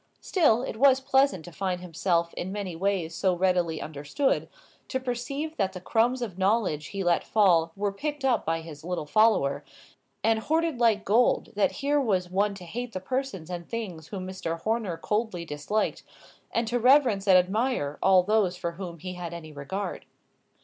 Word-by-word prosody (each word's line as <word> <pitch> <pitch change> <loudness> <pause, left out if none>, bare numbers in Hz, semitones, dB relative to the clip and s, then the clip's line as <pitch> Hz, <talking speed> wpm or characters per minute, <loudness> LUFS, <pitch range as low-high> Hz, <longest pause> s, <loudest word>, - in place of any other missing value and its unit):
Still, 275 - +2
it 220 - -5
was 265 +1 +5
pleasant 265 - +2
to 175 - -10
find 185 +1 -2
himself 170 -1 -1
in 185 - -4
many 195 -4 -4
ways 180 -2 -1
so 185 +1 +1
readily 175 -3 +1
understood; 150 - -1 0.4
to 260 - -2
perceive 270 +5 -4
that 190 -1 0
the 185 - -6
crumbs 240 +6 +1
of 190 -5 -6
knowledge 190 -6 +1
he 195 -1 -4
let 175 -1 +2
fall 175 -6 +3
were 205 0 -1
picked 290 +6 -4
up 250 -4 +2
by 165 0 -1
his 155 -2 -10
little 175 -2 -3
follower, 145 -7 +3 0.6
and 225 0 +3
hoarded 320 +1 0
like 225 -3 +3
gold 230 +5 +3
that 205 - +2
here 290 +1 +3
was 185 -7 0
one 200 +2 +1
to 190 - -10
hate 235 +6 -5
the 185 - -3
persons 190 - -4
and 175 -1 -6
things 185 -9 -5
whom 190 -1 -6
Mr. 180 -3 -4
Horner 220 -6 -1
coldly 210 -1 -2
disliked, 155 +8 -2 0.5
and 230 0 0
to 245 +2 0
reverence 245 -6 +4
and 185 -1 +8
admire 185 - 0
all 190 -1 +5
those 195 -2 +1
for 175 -2 -3
whom 170 -1 -7
he 180 +3 -6
had 175 -1 -6
any 160 -2 -9
regard. 150 +8 -5
195 Hz, 180 wpm, -27 LUFS, 175-230 Hz, 0.6 s, and